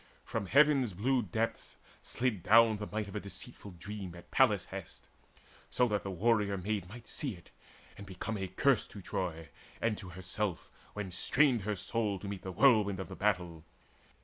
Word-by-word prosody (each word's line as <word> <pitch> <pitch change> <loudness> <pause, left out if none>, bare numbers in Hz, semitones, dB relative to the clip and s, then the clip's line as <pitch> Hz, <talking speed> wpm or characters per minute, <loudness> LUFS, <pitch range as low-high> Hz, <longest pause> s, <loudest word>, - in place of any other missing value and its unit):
From 100 - -3
heavens' 140 -3 +4
blue 120 +1 +1 0.7
Slid 120 -7 -1
down 110 +3 +6
the 105 0 -5
might 105 -1 -3
of 100 - -9
a - - 0
deceitful 100 -1 -8
dream 95 -1 -7
At 85 - -13
Pallas' - - +4
hest, - - -8 0.3
that - - -27 0.3
so 125 - +3
the 105 -3 -1
warrior 100 +1 +2
maid 95 -1 -3
Might 120 +3 -11
see 135 -9 -2
it, 85 - -17 0.5
and 100 - -9
become 95 +4 -4
a 95 -2 -3
curse 115 +7 +2
to 100 - -10
Troy 80 -5 -3 0.3
And 115 -2 +1
to 95 -4 -9
herself, 95 +1 -4 0.2
when 105 -3 -5
strained 125 +6 +3
her 105 +2 -2
soul 105 +1 -1
to 100 - -8
meet; 100 -2 -5
The 95 - -5
whirlwind 105 -3 +4
of 95 - -5
the 95 - -7
battle. 90 -6 -1
100 Hz, 175 wpm, -32 LUFS, 95-115 Hz, 0.7 s, down